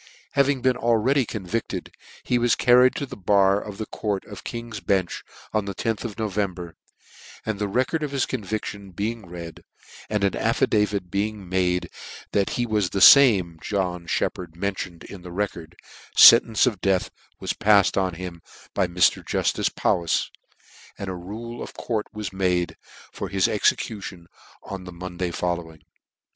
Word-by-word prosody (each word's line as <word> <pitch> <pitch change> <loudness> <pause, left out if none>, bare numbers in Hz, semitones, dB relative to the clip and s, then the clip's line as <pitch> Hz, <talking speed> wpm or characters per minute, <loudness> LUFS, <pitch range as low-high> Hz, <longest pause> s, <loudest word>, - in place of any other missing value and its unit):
Having 140 -2 +2
been 130 -1 +3
already 120 +2 +2
convicted, 110 +2 -4 0.3
he 125 - +1
was 120 0 +3
carried 125 +1 +5
to 140 - -3
the 130 -2 -9
bar 100 +1 +3
of 105 -2 -8
the 110 - -4
court 105 -3 -3
of - - -10
King's 115 -2 -6
Bench 95 -4 -1 0.3
on 105 -2 0
the 100 -1 -5
loth 115 -2 -1
of 115 -4 -6
November, 95 -5 -3 0.7
and 110 -2 -2
the 105 - 0
record 130 +10 0
of 150 - -2
his 135 -2 0
convic 110 -3 -3
tion 100 -1 -7
being 105 +2 -3
read, 85 -1 -9 0.5
and 105 -1 0
an 100 - +1
affidavit 105 -4 +1
being 100 0 -2
made 90 0 0 0.4
that 100 -1 +1
he 120 - +1
was 105 -5 0
the 95 - +8
lame 95 -12 +3
John 90 -4 -2
Sheppard 85 0 -2
mentioned 95 -2 -4
in 100 - -10
the 90 0 -10
record, 85 -3 -4 0.4
fcntence 115 -2 +8
of 110 -7 -1
death 95 -2 +1 0.3
was - - -2
paficd 100 -3 +4
on 95 -3 0
him 85 -1 -7 0.3
by 95 -2 +1
Mr. 90 +1 +2
Juftice - - 0
Powis, 85 -2 +1 0.7
and 100 - -5
a - - -5
rule 110 +7 -7
of - - -8
court 110 -3 -3
was 105 -4 -6
made 90 -2 0 0.4
for 100 - -5
his 95 -1 +2
execution 95 -5 -1 0.4
on 95 -2 -7
the 90 - -8
Monday 90 0 -4
following. 85 -3 -4
100 Hz, 160 wpm, -24 LUFS, 90-110 Hz, 0.7 s, the